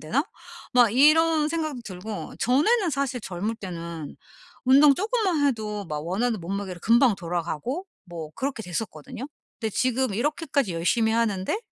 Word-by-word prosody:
되나?' 245 - 0 0.5
막 240 -4 +6
이런 310 +3 +5
생각도 310 -5 -2
들고. 200 +2 -7
전에는 345 - +3
사실 270 -3 -2
젊을 205 +4 -3
때는 170 -6 -7 0.5
운동 275 +2 +7
쪼금만 390 - +1
해도 215 -5 -2
막 150 0 -4
원하는 220 +4 0
몸무게로 185 0 -4
금방 235 +1 +5
돌아가고 175 - -3 0.2
뭐 170 -4 -7
그렇게 265 -4 -3
됐었거든요. 180 - -5 0.3
근데 220 -2 -1
지금 255 -1 0
이렇게까지 280 - 0
열심히 220 +7 +2
하는데 220 - 0
230 Hz, 330 characters per minute, -25 LUFS, 185-280 Hz, 0.5 s, 운동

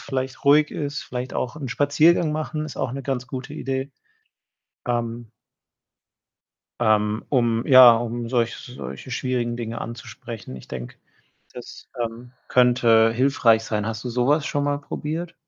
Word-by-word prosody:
vielleicht 130 -1 -4
ruhig 150 +2 +5
ist. 145 -1 -4
Vielleicht 125 +1 -6
auch 125 +1 -2
'n 140 -4 -5
Spaziergang 150 +5 +3
machen 155 0 -3
ist 155 - -8
auch - - -2
'ne 135 0 -5
ganz 125 -2 -3
gute 130 +3 -6
Idee, 135 -1 -3 1.0
ähm 120 -1 -3 1.5
ähm, 110 -1 +2
um, 120 -4 +1
ja 130 -3 +9
um 120 0 -4
solch 120 -2 0
solche 125 - -9
schwierigen 120 -1 -2
Dinge 115 -1 -5
anzusprechen. 115 - -8
Ich 65 - -13
denke, 60 -2 -7 0.6
das, - - -11 0.2
ähm, 120 +2 -7 0.2
könnte 120 -3 +4
hilfreich 120 -3 +3
sein. 105 -2 -2
Hast 110 -1 -4
du 125 - -4
so 125 +2 0
was 150 +1 +2
schon 145 -3 -1
mal 145 0 0
probiert? 160 +4 -5
125 Hz, 145 wpm, -23 LUFS, 115-140 Hz, 1.5 s, ja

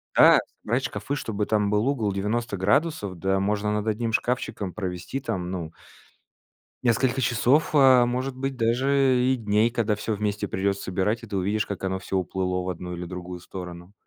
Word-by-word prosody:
да, - - +8 0.2
собрать 120 +5 0
шкафы, 145 - -3
чтобы 105 -6 -2
там 105 -1 +1
был 105 +4 +2
угол 115 -7 0
90 105 +2 -2
градусов, 105 - 0
да 95 +2 +1
можно 105 +1 0
над 105 0 -1
одним 110 +1 -1
шкафчиком 110 -7 -1
провести 90 +4 -4
там, 90 -9 -3
ну 85 -4 -4 1.1
несколько 125 +2 +2
часов, 125 +6 +2
а, 130 -4 +7
может 130 +2 -2
быть, 135 0 -3
даже 130 +2 +2
и 130 - +3
дней, 110 0 +2
когда 115 -3 0
всё 110 +1 -3
вместе 105 0 -2
придется 100 +1 -1
собирать, 100 +5 -1
и 115 - -8
ты 100 - -5
увидишь, 105 +3 0
как 100 -1 -6
оно 95 0 -1
всё 95 +1 -2
уплыло 90 0 -1
в 95 - -3
одну 90 0 -5
или 85 0 -6
другую 90 0 -7
сторону. 90 +1 -9
105 Hz, 180 wpm, -25 LUFS, 95-120 Hz, 1.1 s, да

